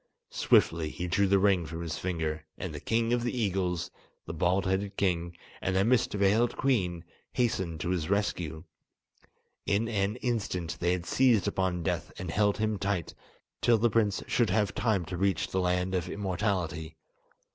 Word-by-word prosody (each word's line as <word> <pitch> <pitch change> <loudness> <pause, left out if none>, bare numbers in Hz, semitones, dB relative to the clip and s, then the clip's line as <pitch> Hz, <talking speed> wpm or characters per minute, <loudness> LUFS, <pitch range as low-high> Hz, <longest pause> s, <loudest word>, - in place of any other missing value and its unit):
Swiftly 80 -2 +3
he 90 - -5
drew 100 +3 +2
the 100 +1 +4
ring 95 -2 +3
from 80 +1 -6
his 80 -2 -4
finger, 80 -4 -2
and 90 -4 -5
the 75 - -5
king 115 +7 0
of 120 - +2
the 120 +1 -2
eagles, 90 -5 -1 0.3
the - - -6
bald 90 +2 +1
headed 95 +1 -1
king, 85 -3 0 0.2
and 95 - -1
the 95 +1 +3
mist 125 0 +3
veiled 105 +4 +2
queen, 90 -11 0 0.3
hastened 95 -10 0
to - - -2
his 85 -2 -1
rescue. 85 -6 -1 1.0
In 105 +4 +2
an 105 -1 0
instant 100 -10 -2
they 90 +1 +2
had 90 -1 -3
seized 120 -1 +3
upon 90 -2 0
Death - - -2
and 90 -2 -4
held 105 +1 +2
him 110 -1 -1
tight, 100 -5 -2 0.5
till 120 -2 +5
the 115 +1 +2
prince 105 -2 +1
should 120 -4 +1
have 105 +1 +1
time 105 -7 0
to 90 +2 -5
reach 95 +1 +1
the 95 - 0
Land 90 +1 0
of 90 -1 -1
Immortality. 90 -5 -2
95 Hz, 175 wpm, -29 LUFS, 85-105 Hz, 1.0 s, till